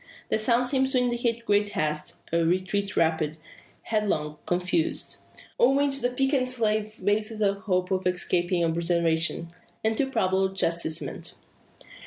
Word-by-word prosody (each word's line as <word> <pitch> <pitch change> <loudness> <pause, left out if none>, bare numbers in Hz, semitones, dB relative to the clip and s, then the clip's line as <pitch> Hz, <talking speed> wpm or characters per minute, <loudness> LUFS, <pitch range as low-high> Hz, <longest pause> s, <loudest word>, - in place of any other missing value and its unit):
The - - +1
sounds 240 +3 +2
seem 265 -1 +2
to 265 0 0
indicate 240 -1 0
great 205 0 +2
haste 150 0 -2
a 170 0 +3
retreat 185 +4 0
rapid, 160 -2 +1 0.5
headlong, 155 -9 -1
confused. 175 -2 0 0.4
On 265 +3 +5
which 280 -1 +1
the 245 - +2
peccant 265 0 +1
slave 215 -3 -1
bases 215 +2 0
a 200 -2 +3
hope 185 -2 -1
of 185 -1 +1
escaping 175 -1 +1
observation, 170 0 0 0.3
and 220 0 +2
too 270 +3 0
probable 190 -4 +1
chastisement. 170 -3 -2
200 Hz, 135 wpm, -26 LUFS, 170-235 Hz, 0.5 s, On